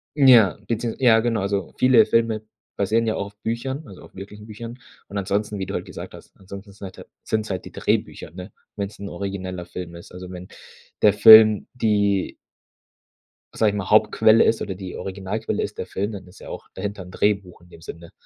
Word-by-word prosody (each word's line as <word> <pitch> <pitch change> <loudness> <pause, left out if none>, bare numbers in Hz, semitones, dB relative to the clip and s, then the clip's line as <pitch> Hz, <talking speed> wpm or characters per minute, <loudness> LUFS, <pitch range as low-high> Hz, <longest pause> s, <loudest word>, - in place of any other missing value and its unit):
Ja, 125 - +6
beziehungs 115 0 -3
ja 115 -3 +5
genau, 115 -3 0
also 100 -2 -2
viele 125 -4 +6
Filme 110 -1 0 0.3
basieren 110 +3 +1
ja 110 - 0
auch 100 - -3
auf 100 - -16
Büchern, 130 +6 -4
also 95 - -13
auf - - -16
wirklichen 105 +2 -10
Büchern 115 +3 -9 0.3
und 100 - -7
ansonsten, 100 +2 -2
wie 95 - -3
du - - -7
halt - - -3
gesagt - - -9
hast, - - -14
ansonsten 100 +1 -11
sind 100 0 -11
halt - - -12 0.2
sind's 110 -1 -2
halt 95 - -4
die - - -10
Drehbücher, - - -2
ne, 90 +4 -10 0.2
wenn's 100 0 -5
'n 100 - -6
origineller 95 -1 -5
Film 85 -2 -8
ist. 85 - -12
Also 90 0 -9
wenn 90 0 -9 0.5
der 105 -1 +5
Film 110 0 +8
die 100 -5 0 1.2
sage 110 - +3
ich 105 - -4
mal, 100 -2 -4
Hauptquelle 110 +1 +5
ist 115 - +1
oder 95 - -4
die 95 -1 -8
Originalquelle 100 +3 -4
ist 105 - -5
der - - -4
Film, 100 +3 -3
dann 95 -2 -8
ist 90 - -17
ja - - -11
auch - - -9
dahinter 100 -2 -5
'n 90 - -13
Drehbuch 100 -3 -1
in 90 - -20
dem 85 - -15
Sinne. 85 +1 -10
100 Hz, 205 wpm, -22 LUFS, 95-110 Hz, 1.2 s, Film